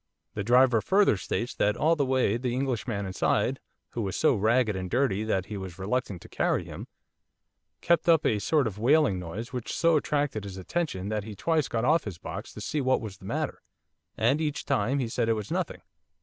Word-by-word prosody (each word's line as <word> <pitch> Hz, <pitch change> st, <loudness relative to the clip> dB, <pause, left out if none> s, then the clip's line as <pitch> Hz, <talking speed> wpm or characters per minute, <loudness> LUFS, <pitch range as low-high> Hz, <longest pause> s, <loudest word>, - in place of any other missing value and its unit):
The 105 Hz, -, -3 dB
driver 120 Hz, 0 st, +5 dB
further 195 Hz, -, +4 dB
states 115 Hz, +5 st, -3 dB
that 105 Hz, 0 st, +1 dB
all 160 Hz, +3 st, +3 dB
the 140 Hz, -4 st, 0 dB
way 130 Hz, -5 st, +2 dB
the 120 Hz, 0 st, -2 dB
Englishman 120 Hz, -6 st, -2 dB
inside, 95 Hz, -1 st, 0 dB, 0.3 s
who 120 Hz, -, -4 dB
was 95 Hz, -3 st, -3 dB
so 155 Hz, -, +3 dB
ragged 110 Hz, 0 st, +2 dB
and 95 Hz, -1 st, -4 dB
dirty 115 Hz, -4 st, +1 dB
that 95 Hz, -4 st, 0 dB
he 105 Hz, -, -6 dB
was 95 Hz, -2 st, -7 dB
reluctant 100 Hz, -1 st, -2 dB
to -, -, -12 dB
carry -, -, 0 dB
him, -, -, -8 dB, 0.9 s
kept 170 Hz, 0 st, +2 dB
up 165 Hz, -2 st, +5 dB
a 105 Hz, -, +2 dB
sort 150 Hz, +6 st, +2 dB
of 105 Hz, -2 st, -4 dB
wailing 130 Hz, -4 st, +3 dB
noise 100 Hz, +9 st, -6 dB
which 125 Hz, -2 st, -4 dB
so 165 Hz, -2 st, +4 dB
attracted 145 Hz, -7 st, -1 dB
his 100 Hz, -2 st, -7 dB
attention 100 Hz, -, -3 dB
that 105 Hz, -1 st, -2 dB
he 105 Hz, 0 st, -8 dB
twice 155 Hz, -, +1 dB
got 115 Hz, -1 st, -1 dB
off 160 Hz, +2 st, +3 dB
his 100 Hz, -6 st, -6 dB
box 90 Hz, +5 st, -7 dB
to 105 Hz, -, -8 dB
see 150 Hz, +8 st, -2 dB
what 130 Hz, 0 st, +2 dB
was 105 Hz, -4 st, -7 dB
the -, -, -13 dB
matter, -, -, -3 dB, 0.6 s
and 125 Hz, +8 st, +2 dB
each 150 Hz, -2 st, -2 dB
time 115 Hz, +7 st, +1 dB
he 130 Hz, -4 st, -1 dB
said 115 Hz, 0 st, -1 dB
it -, -, +4 dB
was 105 Hz, -2 st, -5 dB
nothing. -, -, -2 dB
115 Hz, 210 wpm, -27 LUFS, 100-140 Hz, 0.9 s, driver